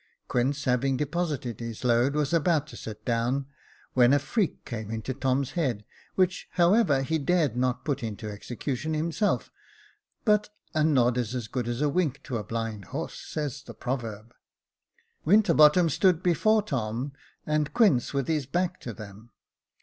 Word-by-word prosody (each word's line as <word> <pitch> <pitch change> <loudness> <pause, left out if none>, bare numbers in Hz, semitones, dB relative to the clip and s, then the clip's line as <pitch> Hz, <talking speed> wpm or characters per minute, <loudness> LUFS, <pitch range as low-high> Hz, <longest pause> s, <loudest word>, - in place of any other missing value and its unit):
Quince 135 +4 0
having 130 +1 +1
deposited 150 - -2
his 115 0 -6
load, 125 +3 +3
was 150 0 0
about 165 -2 +2
to 155 - -12
sit 105 -1 -8
down, 120 +4 0 0.5
when 125 0 +5
a - - +6
freak 190 - -1
came 110 -3 -5
into 110 +3 -3
Tom's 130 0 0
head, 125 -11 -1 0.3
which, 185 -1 +1
however, 175 -6 +4
he 160 +4 0
dared 150 -4 +1
not 125 0 0
put 145 -4 -1
into 110 -2 -5
execution 125 +8 -4
himself; 165 +7 0 0.7
but 210 -1 +3 0.2
"a 155 - +2
nod 125 -5 +3
is 120 +1 -2
as 120 -3 -3
good 125 0 -3
as 120 +2 -2
a 150 - +3
wink 145 -3 0
to 125 - -3
a 105 - -4
blind 115 -2 -4
horse," - - -5
says 145 -3 -4
the 115 -3 -11
proverb, 115 -3 -4 0.9
Winterbottom 170 -3 +6
stood 180 +2 +2
before 215 +5 +3
Tom, 125 - -2 0.3
and 150 -1 0
Quince 200 - +4
with 140 -3 -1
his 150 -5 0
back 180 +4 -1
to 120 - -6
them. 105 +2 -11
135 Hz, 160 wpm, -27 LUFS, 120-160 Hz, 0.9 s, a